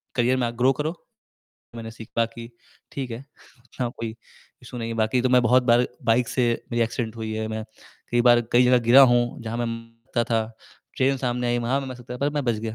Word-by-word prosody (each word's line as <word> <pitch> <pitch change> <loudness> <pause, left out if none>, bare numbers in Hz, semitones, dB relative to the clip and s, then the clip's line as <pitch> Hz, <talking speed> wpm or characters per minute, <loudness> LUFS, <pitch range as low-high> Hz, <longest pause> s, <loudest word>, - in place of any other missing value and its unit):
Career 125 +1 +2
में 125 -2 0
आप 120 - -5
grow 125 +2 +4
करो। 155 +2 -1 0.8
मैंने 115 -1 -7
सीख 110 -1 -11
बाकी 115 0 -1 0.5
ठीक 135 -3 -5
है, 115 - -5 0.4
इतना 125 0 -5
कोई 115 -1 -6 0.5
इश्यू 125 0 -9
नहीं 115 -1 -4
है। - - -3
बाकी 110 +3 +1
तो 130 - +2
मैं 125 0 +5
बहुत 125 +2 +4
बार 120 0 +4 0.2
बाइक 115 +1 +2
से 130 - 0 0.3
मेरी 120 0 +2
एक्सीडेंट 115 0 -4
हुई 110 -1 -4
है, 110 0 -3
मैं 110 0 -4 0.5
कई 120 - +2
बार 120 0 +6
कई 125 +1 +6
जगह 125 0 +5
गिरा 125 +4 +8
हूँ 120 0 0
जहाँ 115 0 -4
मैं 120 - -1
मर 115 +1 -4
था, 115 -1 +2 0.5
ट्रेन 135 +1 +2
सामने 125 -1 -2
आयी 120 0 +1
वहाँ 120 +4 0
मैं 135 - -6
मर 130 - -6
सकता 125 0 -9
था - - -7
पर 140 +2 0
मैं 145 -1 -2
बच 120 -2 +1
गया, 110 +1 -5
120 Hz, 230 wpm, -24 LUFS, 115-125 Hz, 0.8 s, गिरा